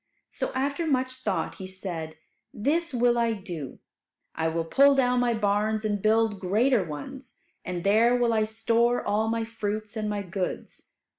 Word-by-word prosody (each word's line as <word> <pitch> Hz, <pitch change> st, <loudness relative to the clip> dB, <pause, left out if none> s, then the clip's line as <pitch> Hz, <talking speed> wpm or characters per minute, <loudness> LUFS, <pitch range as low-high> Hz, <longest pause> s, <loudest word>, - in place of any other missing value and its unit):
So -, -, -3 dB
after 280 Hz, +5 st, -1 dB
much 260 Hz, -3 st, +1 dB
thought 190 Hz, -10 st, -3 dB
he 190 Hz, -, -6 dB
said, 175 Hz, -4 st, -6 dB, 0.3 s
"This 315 Hz, +9 st, 0 dB
will 240 Hz, -1 st, +2 dB
I 230 Hz, -1 st, +2 dB
do. 170 Hz, -, -7 dB, 0.6 s
I 160 Hz, 0 st, -1 dB
will 165 Hz, 0 st, -1 dB
pull 275 Hz, +10 st, +5 dB
down 250 Hz, -2 st, +3 dB
my 240 Hz, -1 st, +2 dB
barns 215 Hz, +1 st, 0 dB
and 205 Hz, -2 st, -1 dB
build 220 Hz, -1 st, +2 dB
greater 215 Hz, +5 st, +2 dB
ones, 165 Hz, -, -8 dB, 0.3 s
and 180 Hz, -1 st, -4 dB
there 225 Hz, +5 st, +4 dB
will 240 Hz, -1 st, +2 dB
I 215 Hz, -1 st, +2 dB
store 230 Hz, +2 st, +1 dB
all 215 Hz, +2 st, +1 dB
my 225 Hz, 0 st, -1 dB
fruits 215 Hz, -1 st, -4 dB
and 215 Hz, -1 st, -2 dB
my 205 Hz, -1 st, -2 dB
goods. 185 Hz, 0 st, -5 dB
220 Hz, 165 wpm, -27 LUFS, 195-245 Hz, 0.6 s, pull